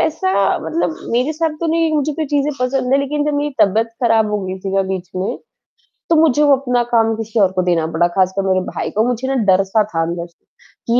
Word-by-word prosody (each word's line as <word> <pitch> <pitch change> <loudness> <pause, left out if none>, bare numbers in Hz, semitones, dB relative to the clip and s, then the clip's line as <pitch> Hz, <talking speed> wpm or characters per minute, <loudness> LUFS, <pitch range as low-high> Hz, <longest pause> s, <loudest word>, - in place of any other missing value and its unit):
ऐसा 300 -12 0 0.3
मतलब 160 +1 -2 0.2
मेरे 250 +6 +1
साथ 325 +1 -1
तो 335 - -1
नहीं 330 -1 +1
मुझे 300 0 0
तो 315 - -3
ये - - -2
चीज़ें 290 +1 0
पसंद 255 0 0
हैं 275 - +5
लेकिन 290 +1 -1
जब 300 0 -1
मेरी 290 +1 -1
तबीयत 220 +4 +3
ख़राब 225 -3 +3
हो 210 - 0
गई 185 0 -5
थी 195 0 -4
ना 195 - +3
बीच 185 -1 -5
में, 185 +2 -2 0.7
तो 335 - +4
मुझे 310 -3 +3
वो 285 -2 +5
अपना 250 -2 0
काम 225 -1 +3
किसी 225 0 -3
और 195 -3 +4
को 185 -1 0
देना 165 -2 +1
बड़ा 175 - +3
ख़ासकर 190 +1 +2
मेरे 185 0 +2
भाई - - -4
को, 215 - +1
मुझे 250 +1 -2
ना 270 - -1 0.2
डर-सा 195 +3 +2
था 165 - 0
अंदर 170 +1 -3
से, 170 - -34 0.4
कि 235 +1 +3
230 Hz, 240 wpm, -18 LUFS, 190-285 Hz, 0.7 s, हैं